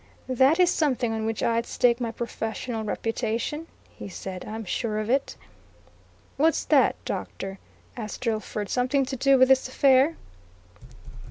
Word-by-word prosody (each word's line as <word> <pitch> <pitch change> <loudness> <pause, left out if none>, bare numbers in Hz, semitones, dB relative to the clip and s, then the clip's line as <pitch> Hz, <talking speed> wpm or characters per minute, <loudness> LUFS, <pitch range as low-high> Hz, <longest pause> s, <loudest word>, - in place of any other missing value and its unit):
"That 265 +6 +4
is 355 -1 +5
something 255 -7 0
on 220 0 -2
which 225 -1 -2
I'd 230 0 +1
stake 245 -1 +2
my 235 - -1
professional 225 0 -4
reputation," 225 +8 -2 0.2
he - - -10
said. 185 0 -7
"I'm 220 +1 -5
sure 215 +3 -2
of 215 +2 -2
it." 270 +1 0 1.0
"What's 320 +3 +2
that, - - +4
Doctor?" 195 0 -5 0.4
asked 215 -1 -6
Drillford. 215 -3 -2
"Something 255 +5 +1
to 265 +1 -4
do 275 +1 +4
with 260 0 +6
this 265 -1 +4
affair?" 270 +4 +4
240 Hz, 145 wpm, -26 LUFS, 220-265 Hz, 1.0 s, with